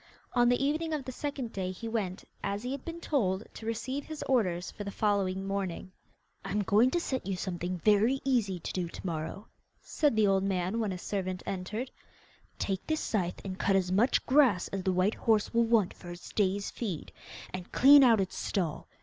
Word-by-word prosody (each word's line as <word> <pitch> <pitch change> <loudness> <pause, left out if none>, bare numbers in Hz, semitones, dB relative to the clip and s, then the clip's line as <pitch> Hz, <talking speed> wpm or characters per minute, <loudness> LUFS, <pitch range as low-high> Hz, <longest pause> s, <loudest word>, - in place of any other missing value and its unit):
On 240 -1 +4
the 245 +3 +2
evening 315 +3 0
of 280 -4 -5
the 260 - -4
second 265 -3 -4
day 185 -2 -2
he 230 +5 -7
went, 205 -5 -2 0.2
as 200 +2 -2
he 250 - -3
had 275 -1 -5
been 335 0 -6
told, 210 - 0
to 220 - -8
receive 260 +5 -2
his 310 -1 -6
orders 185 -9 +1
for 205 - -7
the 200 - -4
following 195 -2 0
morning. 195 -2 -3 0.5
'I 195 - -5
am 210 - +1
going 215 +6 +4
to 345 - 0
set 260 - -3
you 195 - -1
something 180 0 -3
very 220 +5 +4
easy 220 -9 +1
to - - -5
do 180 -2 -1
to - - -10
morrow,' 165 +4 -4 0.3
said 295 -7 0
the 215 -1 +4
old 195 -1 +3
man 190 +2 0
when 220 -2 0
his 180 -1 -5
servant 185 -2 -3
entered. 210 +7 -4 0.7
'Take 190 -2 -2
this 315 0 0
scythe 180 -4 -2
and 185 -1 -5
cut 195 - +2
as 185 -1 +1
much 215 +7 +3
grass 255 -10 +4
as 195 - -3
the 190 - +1
white 185 +4 +2
horse 220 -2 +1
will 235 0 +4
want 225 -5 +3
for 175 - -11
its 175 0 -9
day's 200 -1 0
feed, 195 -10 -5 0.4
and 185 -1 -6
clean 280 +2 +8
out 230 -4 +6
its 190 -1 -2
stall. 165 -5 -2
200 Hz, 210 wpm, -30 LUFS, 185-245 Hz, 0.7 s, clean